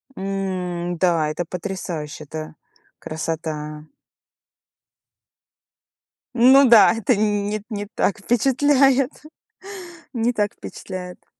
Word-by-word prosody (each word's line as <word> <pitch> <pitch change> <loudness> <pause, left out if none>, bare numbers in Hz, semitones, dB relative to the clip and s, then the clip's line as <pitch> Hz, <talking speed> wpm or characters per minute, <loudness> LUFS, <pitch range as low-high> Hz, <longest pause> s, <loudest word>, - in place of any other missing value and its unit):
М, 185 -3 -3
да, 165 -3 +2
это 170 +3 -3
потрясающе, 170 -5 -6
это 155 +1 -8 0.4
красота. 155 -1 -5 2.5
Ну 260 +2 +6
да, 230 -3 +7
это 225 +1 +1
нь 205 -1 0
нет, 210 -1 -3
не 205 -2 -5
так 210 -1 -1
впечатляет. 270 +4 +3 1.0
Не 240 0 0
так 210 -2 -1
впечатляет. 180 -1 -9
195 Hz, 90 wpm, -22 LUFS, 165-230 Hz, 2.5 s, да